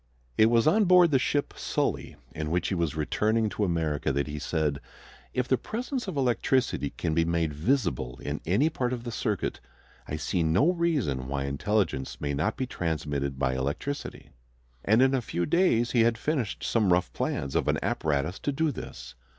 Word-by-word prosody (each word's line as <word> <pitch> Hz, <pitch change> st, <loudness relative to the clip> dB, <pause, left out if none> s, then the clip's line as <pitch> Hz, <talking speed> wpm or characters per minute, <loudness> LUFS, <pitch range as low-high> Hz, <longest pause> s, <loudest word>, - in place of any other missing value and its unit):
It 110 Hz, -, +6 dB
was 115 Hz, 0 st, +3 dB
on 205 Hz, +7 st, +4 dB
board 180 Hz, -2 st, +6 dB
the 135 Hz, -, +4 dB
ship 145 Hz, +2 st, 0 dB
Sully, -, -, -2 dB, 0.2 s
in 75 Hz, -1 st, -3 dB
which 90 Hz, +1 st, 0 dB
he -, -, -1 dB
was 85 Hz, -4 st, -1 dB
returning 110 Hz, +8 st, +1 dB
to 105 Hz, -, -2 dB
America, 80 Hz, -7 st, 0 dB
that 70 Hz, +1 st, 0 dB
he 75 Hz, 0 st, -5 dB
said, 75 Hz, -3 st, -1 dB, 0.5 s
"If 125 Hz, 0 st, -1 dB
the 130 Hz, -, +2 dB
presence 245 Hz, +2 st, -4 dB
of 185 Hz, -, -4 dB
electricity 125 Hz, -, +1 dB
can 80 Hz, +2 st, -3 dB
be 85 Hz, +1 st, +3 dB
made 85 Hz, -2 st, 0 dB
visible 80 Hz, -, 0 dB
in 75 Hz, +1 st, -4 dB
any 105 Hz, -, +2 dB
part 125 Hz, -4 st, -1 dB
of 120 Hz, -2 st, -5 dB
the 120 Hz, -, -5 dB
circuit, 105 Hz, -3 st, -2 dB, 0.5 s
I 75 Hz, -, -3 dB
see 85 Hz, +3 st, -1 dB
no 95 Hz, -, +3 dB
reason 140 Hz, -, 0 dB
why 70 Hz, 0 st, -2 dB
intelligence 70 Hz, +1 st, -1 dB
may 70 Hz, -1 st, -2 dB
not 75 Hz, +10 st, -1 dB
be 130 Hz, -, -1 dB
transmitted 75 Hz, -, -2 dB
by 65 Hz, -1 st, +1 dB
electricity." 70 Hz, -, -4 dB, 0.5 s
And 110 Hz, +5 st, +4 dB
in 135 Hz, 0 st, +3 dB
a 130 Hz, -, +1 dB
few 85 Hz, -6 st, -2 dB
days 125 Hz, -, +2 dB
he 120 Hz, -, +4 dB
had 115 Hz, 0 st, +3 dB
finished 130 Hz, -5 st, -2 dB
some 105 Hz, -5 st, +2 dB
rough 90 Hz, +1 st, +2 dB
plans 70 Hz, -, -2 dB
of -, -, 0 dB
an -, -, +2 dB
apparatus 75 Hz, +4 st, -1 dB
to 145 Hz, -, -1 dB
do 155 Hz, +2 st, 0 dB
this. -, -, -8 dB
95 Hz, 190 wpm, -27 LUFS, -, 0.5 s, It